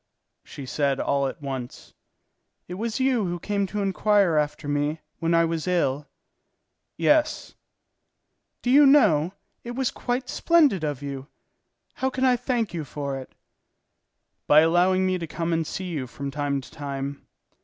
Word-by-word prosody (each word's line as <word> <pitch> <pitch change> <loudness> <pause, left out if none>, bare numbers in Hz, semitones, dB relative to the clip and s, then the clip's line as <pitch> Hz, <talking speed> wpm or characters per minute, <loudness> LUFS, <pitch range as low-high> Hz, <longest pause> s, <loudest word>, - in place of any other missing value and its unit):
"So," 145 - -9
said 140 +1 0
she - - -2
all 140 -1 +1
at 140 - -8
once, 130 -3 -6 0.7
"it 180 - -7
was 225 +5 -3
you 260 -5 +2
who 175 0 -3
came 200 +1 -1
to 205 +1 -3
inquire 195 -2 +2
after 150 0 -1
me 145 +2 -1 0.2
when 165 0 +1
I 165 0 +4
was 165 0 -3
ill?" 150 -5 0 0.9
"Yes." 305 0 +2 1.1
"Do 245 - +1
you 285 +1 +7
know, 180 - +4 0.3
it 240 0 -6
was 265 -1 0
quite 250 +1 -3
splendid 300 - +3
of 145 -3 -3
you! 140 -1 -6 0.7
How 265 - -1
can 260 0 -1
I 255 -1 +5
thank 235 -4 -2
you 165 -3 -3
for 140 -1 -5
it?" 130 - -12 1.1
"By 150 +1 +7
allowing 180 +3 +3
me 185 -1 0
to 165 - -5
come 165 +1 -2
and 165 -1 0
see 185 -1 -5
you 145 -7 -3
from 140 +3 -6
time 145 -1 -1
to - - -14
time." 140 -2 -6
165 Hz, 165 wpm, -25 LUFS, 145-210 Hz, 1.1 s, you